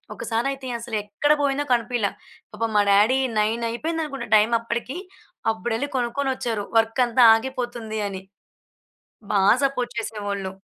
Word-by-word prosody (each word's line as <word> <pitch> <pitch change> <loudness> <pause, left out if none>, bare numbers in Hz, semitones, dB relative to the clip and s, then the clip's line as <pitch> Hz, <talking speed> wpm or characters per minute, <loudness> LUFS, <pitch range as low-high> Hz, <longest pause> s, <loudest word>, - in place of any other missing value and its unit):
ఒకసారయితే 260 +3 -2
అసలెక్కడ 220 +4 -1
బోయిందో 280 +1 0
కనిపీయలా. 235 -3 0 0.4
పాపం 230 -1 -2
మా 205 - +5
daddy 215 +6 +5 0.2
నైనయిపోయిందనుకుంటా 240 +8 -2
time 215 +2 +4
అప్పడికీ, 235 +5 -4 0.6
అబ్బుడెళ్ళి 235 +5 -3
కొనుక్కొనొచ్చారు. 245 -3 -2
వర్కంతా 235 +2 +3
ఆగిపోతుందీ 240 -3 -4
అని. 190 -1 -6 1.1
బా 200 -2 +3 0.2
సపోర్ట్ 250 -3 -3
చేసేవాళ్ళు. 200 -3 -4
235 Hz, 100 wpm, -23 LUFS, 220-260 Hz, 1.1 s, మా